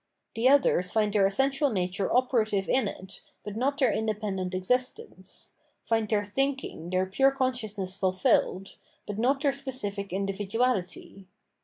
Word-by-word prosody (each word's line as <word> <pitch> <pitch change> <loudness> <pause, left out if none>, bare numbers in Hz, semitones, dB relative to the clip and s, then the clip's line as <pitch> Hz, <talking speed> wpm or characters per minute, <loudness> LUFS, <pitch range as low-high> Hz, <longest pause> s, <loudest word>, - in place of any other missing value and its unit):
The 235 +3 +3
others 260 -10 +3
find 210 -2 +1
their 200 -2 +4
essential 270 +7 +1
nature 185 -2 -1
operative 220 -6 +1
in 255 -5 +2
it, 190 -1 -8 0.2
but 210 0 -6
not 275 +5 0
their 260 -6 +3
independent 205 -4 -2
existence 250 - -3 0.3
find 225 -2 0
their 205 -2 +1
thinking, 270 - -2
their 185 +1 +1
pure 270 +9 +3
consciousness 230 -8 -2
fulfilled, 190 0 +1 0.3
but 205 0 -5
not 270 +4 +2
their 280 -2 +3
specific 210 -8 -3
individuality. 195 0 -2
210 Hz, 135 wpm, -28 LUFS, 195-255 Hz, 0.3 s, their